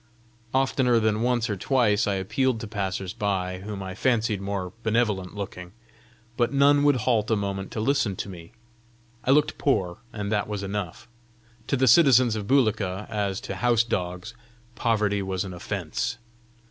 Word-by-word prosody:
Oftener 130 -2 +2
than 110 -1 +1
once 120 -1 +1
or 105 - -2
twice 105 -1 +2
I 100 - +1
appealed 115 +6 0
to 110 - -5
passers 95 -3 -3
by 95 -4 -2
whom 100 0 -6
I 95 0 -6
fancied 110 -2 0
more 100 -2 -4
benevolent 110 -5 0
looking, 90 -3 -7 0.6
but 120 -1 +2
none 140 +1 +4
would 145 -1 +5
halt 115 -4 +2
a 110 - +3
moment 100 -2 -3
to - - -3
listen 115 -4 +1
to - - -5
me. 85 -1 -10 0.7
I - - -2
looked 145 +2 +3
poor, 90 -11 0
and 105 -3 -4
that 105 -1 0
was 105 -2 -4
enough: 100 -3 -5 0.6
to 135 - +1
the 130 +1 +2
citizens 130 -4 +6
of 105 -2 -4
Bulika, 105 -7 +1
as 100 -3 -1
to - - -6
house 120 -1 +3
dogs, 90 -1 -3 0.4
poverty 105 -4 +1
was 95 0 -2
an 95 - -7
offence! 90 - -3
105 Hz, 165 wpm, -25 LUFS, 95-120 Hz, 0.7 s, citizens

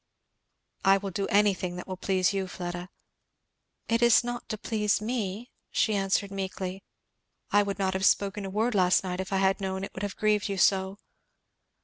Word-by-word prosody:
"I 195 0 +6
will 195 0 -5
do 195 +3 -2
anything 195 -3 +2
that 180 - -7
will 185 - -4
please 185 0 +1
you, 195 -1 -1
Fleda." 175 0 -6 1.0
"It 230 +1 +1
is 240 0 +6
not 240 0 -5
to 215 - -3
please 210 0 0
me, 220 0 -3
" - - -53
she 220 - +1
answered 195 0 0
meekly. 190 -1 -4 0.7
"I 205 - +5
would 200 -2 -2
not 190 -1 0
have 190 +1 0
spoken 200 0 +1
a 195 - -4
word 220 +5 0
last 185 -2 +3
night 180 -1 -4
if 190 +1 -4
I 195 - +1
had 190 +1 +2
known 190 0 -3
it - - -6
would 190 - -7
have 205 -2 -3
grieved 210 -1 +1
you 195 - -2
so." 190 +1 +2
195 Hz, 195 wpm, -28 LUFS, 190-210 Hz, 1.0 s, I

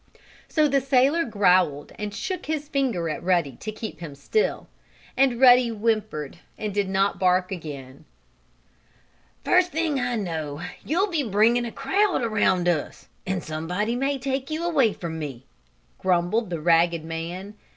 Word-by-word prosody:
So 305 -1 +2
the 275 -1 +2
sailor 275 +5 +3
growled 180 - +2
and 210 -1 -3
shook 370 - -5
his 305 -2 -2
finger 255 - -1
at 155 - -3
Ruddy 175 -5 +1
to 215 - -7
make 215 +1 -6
him 165 -4 -7
keep - - -16
still, 430 - -1 0.5
and 260 -3 +2
Ruddy 250 -2 +7
whimpered 215 -9 -2 0.2
and 210 -2 -4
did 200 -1 0
not 195 -1 +1
bark 185 0 +2
again. 145 -5 -8 1.4
"First 360 0 +3
thing 315 -3 0
I 245 -1 -1
know 160 -8 -4 0.2
you'll 370 +6 0
be 325 -3 +1
bringing 230 +1 +2
a 235 - -5
crowd 375 - +1
around 190 -5 +1
us, 165 -4 -2 0.2
and 185 -1 -2
somebody 180 +9 -2
may 275 +2 0
take 270 +1 -3
you 315 +2 -3
away 280 -10 +3
from 165 -4 -6
me," 135 -5 -7 0.5
grumbled 185 +4 +1
the 170 -2 -3
ragged 170 0 +3
man. 170 +5 -6
205 Hz, 155 wpm, -24 LUFS, 170-265 Hz, 1.4 s, Ruddy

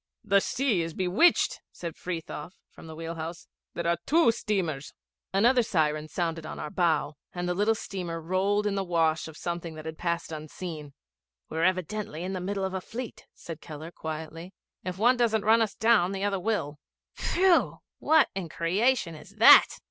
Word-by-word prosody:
'The 200 -2 +4
sea 245 -8 0
is 165 -1 -4
bewitched,' 190 - +3
said 170 -2 -7
Frithiof 170 -1 -6 0.2
from - - -13
the 160 - -9
wheel 165 +1 -5
house. 165 +1 -6 0.3
'There 170 - -3
are 170 0 +2
two 320 -5 +5
steamers!' 175 -11 -3 0.4
Another 240 +6 +4
siren 155 -7 0
sounded 165 -1 -2
on 155 - -7
our 150 - -5
bow, 160 -4 +1 0.2
and 180 0 -3
the 180 - +1
little 210 +4 +2
steamer 180 -5 -5
rolled 190 +5 0
in 205 - +1
the 195 -1 -1
wash 165 -3 +1
of 160 -1 -11
something 170 -2 -4
that 155 0 -9
had 160 0 -6
passed 170 -1 -2
unseen. 155 -1 -7 0.6
'We're 160 +2 +1
evidently 185 -2 -1
in 185 +1 -3
the 185 - -3
middle 195 +1 -2
of 190 - -4
a 190 - -2
fleet,' 235 +4 -8
said 165 -2 -9
Keller 155 +2 -8
quietly. 160 +3 -7 0.3
'If 185 0 -4
one 245 +5 +4
doesn't 225 -3 +1
run 225 +1 +5
us 220 - 0
down, 220 -5 +3
the 195 0 -3
other 200 -1 0
will. 175 -8 -2 0.3
Phew! 365 -1 +2 0.2
What 315 0 +4
in 190 -4 -4
creation 190 +4 +1
is 155 +6 -13
that?' 220 - +8
180 Hz, 180 wpm, -28 LUFS, 160-205 Hz, 0.6 s, that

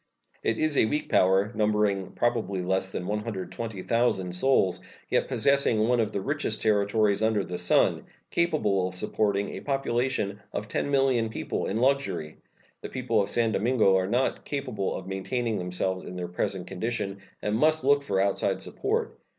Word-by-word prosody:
It 115 - 0
is 155 -2 +1
a - - +5
weak 150 +6 -2
power, 95 +3 +3
numbering 105 -3 +1
probably 110 -6 0
less 95 +1 0
than 90 - -4
120,000 105 -1 -2
souls, 95 -2 +2
and - - -20 0.2
yet - - +1
possessing 125 -3 +3
one 125 0 +2
of 110 -2 +1
the 100 - -2
richest 135 -3 -1
territories 105 -1 +2
under 110 -2 +2
the 90 -1 -5
sun, - - +2 0.3
capable 145 - +1
of 90 - -7
supporting 100 +1 0
a - - -6
population 130 -6 -1
of 105 - -3
10,000,000 135 -3 +1
people - - -3
in 100 - -1
luxury. 130 - 0 0.4
The - - -6
people 120 -4 0
of 100 - -2
San 115 -2 +1
Domingo 110 -2 +3
are 95 0 +1
not 125 +5 0
capable 130 -9 -3
of 95 - -6
maintaining 110 +4 -2
themselves 90 +1 -2
in 90 - -8
their 90 -1 -4
present 90 +1 -3
condition, 100 0 -3 0.2
and 105 - -1
must 155 +6 +3
look 140 +1 +4
for 100 -9 -1
outside 100 0 +1
support. - - -2
105 Hz, 165 wpm, -27 LUFS, 95-125 Hz, 0.4 s, a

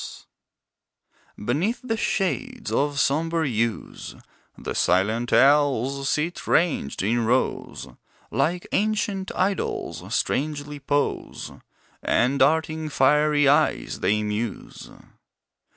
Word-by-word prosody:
Owls - - -9 1.2
Beneath 170 - 0
the 230 -3 -1
shades 220 +4 -2
of 145 0 0
sombre 160 +3 +1
yews, 115 -2 -3 0.4
The - - -5
silent 110 +6 +1
owls 140 -1 +3
sit 165 +4 -2
ranged 160 - +1
in 115 +4 +1
rows, 125 +3 -1 0.4
Like 175 +2 0
ancient 205 -2 0
idols, 195 +1 -1
strangely 145 0 -2
pose, 145 +1 -2 0.5
And 125 +4 +1
darting 155 +2 +2
fiery 150 +1 +3
eyes, 150 +3 +2
they 105 +1 +1
muse. 105 +2 -5
145 Hz, 95 wpm, -24 LUFS, 125-165 Hz, 1.2 s, owls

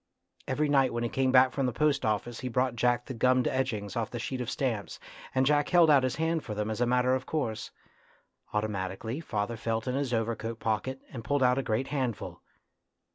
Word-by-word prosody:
Every 150 +3 +1
night 135 -3 +3
when 120 0 -1
he 120 - -1
came 130 +1 +1
back 130 0 +6
from 135 -1 0
the - - 0
post 145 +3 +1
office 110 +2 -1
he 130 - -4
brought 125 0 0
Jack 120 0 +1
the 130 - -6
gummed 125 +1 +3
edgings 110 -7 -2
off 115 -1 -1
the 120 - -5
sheets 125 +2 -3
of 120 - -3
stamps, 115 -7 -2 0.4
and 130 0 +3
Jack 145 +1 +2
held 170 -3 +6
out 140 -2 +6
his 130 -2 -1
hand 160 +1 0
for 105 - -5
them 105 +1 -2
as 110 - -3
a 120 - +3
matter 125 +1 +3
of 130 0 -2
course. 120 -8 -2 0.8
Automatically 105 +3 -2
father 115 -6 -3
felt 115 +1 -2
in 125 - 0
his 135 -1 -1
overcoat 115 0 -2
pocket 115 +5 -2
and 115 -3 -6
pulled 145 +3 +1
out 125 +1 +4
a - - +1
great 120 +1 -1
handful. 130 -6 -3
125 Hz, 215 wpm, -29 LUFS, 115-135 Hz, 0.8 s, back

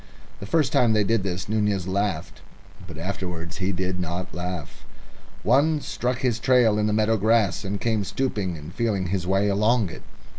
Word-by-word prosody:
The 100 - -7
first 145 +2 +1
time 115 -3 +4
they 105 -1 +3
did 115 +1 +1
this 95 -1 -3
Nunez 105 -3 0
laughed. 95 -3 -2 0.5
But 80 -4 -9
afterwards 85 -1 -5
he 95 0 0
did 95 0 -2
not 90 +1 -4
laugh. 90 -2 -5 0.6
One 145 +8 +3
struck 125 -2 -2
his 120 -3 +1
trail 115 -3 +4
in 105 - +2
the - - +1
meadow 110 +1 +2
grass, 110 -2 +2
and 100 +1 -3
came 110 -2 0
stooping 100 -6 -2
and 75 +3 -10
feeling 100 -6 -1
his 90 -2 -2
way 95 +2 +2
along 105 0 +2
it. - - -10
100 Hz, 180 wpm, -24 LUFS, 90-115 Hz, 0.6 s, time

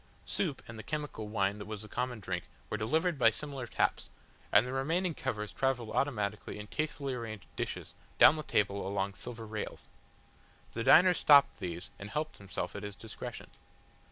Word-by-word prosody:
Soup 155 -9 -1
and 115 -1 -8
the - - -10
chemical 145 -8 -3
wine 100 -1 0
that 105 - -7
was 110 -1 -5
the - - -9
common 125 +1 -2
drink 90 -3 -3 0.3
were - - +1
delivered 155 - +1
by 115 - +7
similar 135 +1 -5
taps, - - 0 0.4
and 110 - +6
the 125 - -4
remaining 165 +7 +1
covers 105 -7 -3
travelled 125 -4 0
automatically 105 -8 -1
in 105 - -6
tastefully 140 +2 -2
arranged 110 -5 -5
dishes - - -4 0.2
down - - +9
the 155 - -3
table 100 -7 +1
along 100 0 -1
silver 115 +1 -7
rails. 110 0 -5 0.8
The 115 - -2
diner 180 +8 +8
stopped 145 -8 +6
these 85 -2 -5
and 100 - -7
helped 155 +5 -3
himself 100 -1 -4
at - - -4
his 105 -1 -6
discretion. 110 +1 -8
115 Hz, 175 wpm, -32 LUFS, 105-140 Hz, 0.8 s, down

